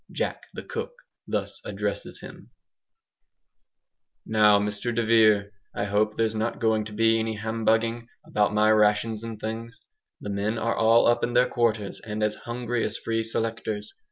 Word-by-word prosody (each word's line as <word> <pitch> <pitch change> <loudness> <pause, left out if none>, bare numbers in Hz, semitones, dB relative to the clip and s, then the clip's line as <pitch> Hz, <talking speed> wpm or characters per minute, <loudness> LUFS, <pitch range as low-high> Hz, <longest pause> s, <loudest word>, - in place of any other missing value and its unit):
"Jack - - -3
the - - -6
Cook" - - -5 0.3
thus - - -3
addresses - - -4
him: - - -12 1.8
"Now, 105 -1 +5
Mr 105 +3 -2
de 120 - +1
Vere, 110 -3 +4 0.2
I - - -1
hope 105 +1 +1
there's 110 -1 +1
not 110 +1 -2
going 110 -1 +1
to 105 - -8
be 115 +1 +3
any 110 0 -2
humbugging 115 +1 0 0.2
about 105 0 +1
my 105 +1 +4
rations 110 +1 +2
and 115 -2 -6
things! 115 +1 -6 0.4
The 105 - -5
men 105 +3 -1
are 115 +1 0
all 115 +1 +5
up 120 0 +3
in 120 - -1
their 125 +1 +4
quarters, 110 -4 -1
and 105 -1 -3
as 105 0 +1 0.2
hungry 120 -1 -2
as - - -1
free 115 0 -1
selectors. 110 -2 -3
110 Hz, 160 wpm, -26 LUFS, 105-115 Hz, 1.8 s, Now